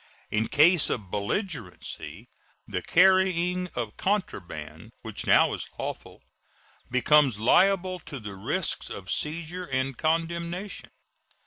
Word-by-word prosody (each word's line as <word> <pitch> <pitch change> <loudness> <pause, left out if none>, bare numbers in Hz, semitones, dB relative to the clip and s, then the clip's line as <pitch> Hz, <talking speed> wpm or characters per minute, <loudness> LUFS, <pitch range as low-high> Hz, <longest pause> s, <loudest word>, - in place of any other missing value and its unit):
In 110 +1 +1
case 165 +2 +5
of 100 -6 -4
belligerency 115 - -4 0.4
the 90 - -3
carrying 180 - +3
of 115 -3 -4
contraband, 95 - -3
which - - -3
now - - +5
is - - -5
lawful, - - -6 0.7
becomes 130 -1 +4
liable 185 - +3
to 145 -4 -7
the 105 -3 -7
risks 140 - -2
of 95 -2 -7
seizure 170 +4 -1
and 130 -1 -1
condemnation. 170 - -2
155 Hz, 110 wpm, -27 LUFS, 115-180 Hz, 0.7 s, case